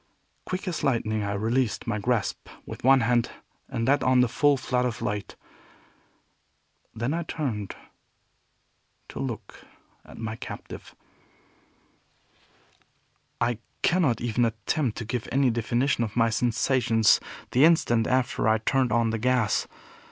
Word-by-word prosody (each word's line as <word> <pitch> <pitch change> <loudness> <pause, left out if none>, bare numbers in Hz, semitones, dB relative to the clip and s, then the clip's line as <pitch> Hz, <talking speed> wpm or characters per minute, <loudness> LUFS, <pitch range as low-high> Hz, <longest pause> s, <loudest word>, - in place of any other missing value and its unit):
Quick 185 +1 -4
as 170 -4 -3
lightning 115 -6 0
I 100 0 -2
released 115 +4 0
my 105 -2 -2
grasp 115 -1 -1 0.2
with - - -9
one 135 +1 +6
hand 120 0 +2 0.4
and 115 +1 -2
let 145 +2 +3
on 130 0 +4
the 125 - +4
full 145 +4 +3
flood 125 -1 -1
of 120 -3 -2
light. 105 -3 -4 1.6
Then 120 +6 -1
I 170 - -1
turned 130 - -4 1.3
to - - -8
look - - -6 0.4
at - - -14
my 110 -1 -5
captive. - - -9 2.4
I 120 -1 0 0.2
cannot 165 -9 +2
even 120 0 0
attempt 115 +3 -1
to 115 - -5
give 120 +1 -4
any 135 -1 +3
definition 120 +3 0
of 105 -3 -5
my 115 -1 +3
sensations 115 -1 +3 0.3
the 130 - +4
instant 120 -9 +4
after 130 -3 +1
I 110 0 +4
turned 130 +3 +1
on 115 -1 +2
the 115 - -2
gas. 125 -2 +1
120 Hz, 135 wpm, -26 LUFS, 110-130 Hz, 2.4 s, one